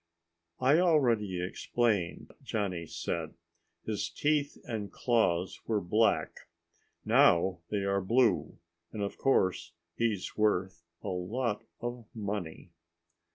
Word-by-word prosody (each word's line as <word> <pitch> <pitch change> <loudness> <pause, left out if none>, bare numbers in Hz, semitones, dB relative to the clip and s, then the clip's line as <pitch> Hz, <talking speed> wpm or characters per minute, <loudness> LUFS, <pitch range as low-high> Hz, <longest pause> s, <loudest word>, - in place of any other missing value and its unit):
"I 135 +5 +5
already 115 - +2
explained," 100 -1 -1
Johnny 90 -6 -2
said. 80 0 -4 0.5
"His 110 -2 -2
teeth 145 -1 0
and 110 -4 -4
claws 110 -9 +1
were 110 -2 +1
black. 105 +5 +1 0.6
Now 90 +1 +4
they 105 -2 -1
are 100 0 +1
blue 115 +5 +2 0.3
and, 105 -2 -3
of 100 - -4
course, 95 -10 +1 0.2
he's 110 -5 -1
worth 95 -5 +1 0.2
a 105 - -3
lot 105 +5 -2 0.2
of 120 -2 -5
money." 100 -5 -5
105 Hz, 110 wpm, -31 LUFS, 90-120 Hz, 0.6 s, I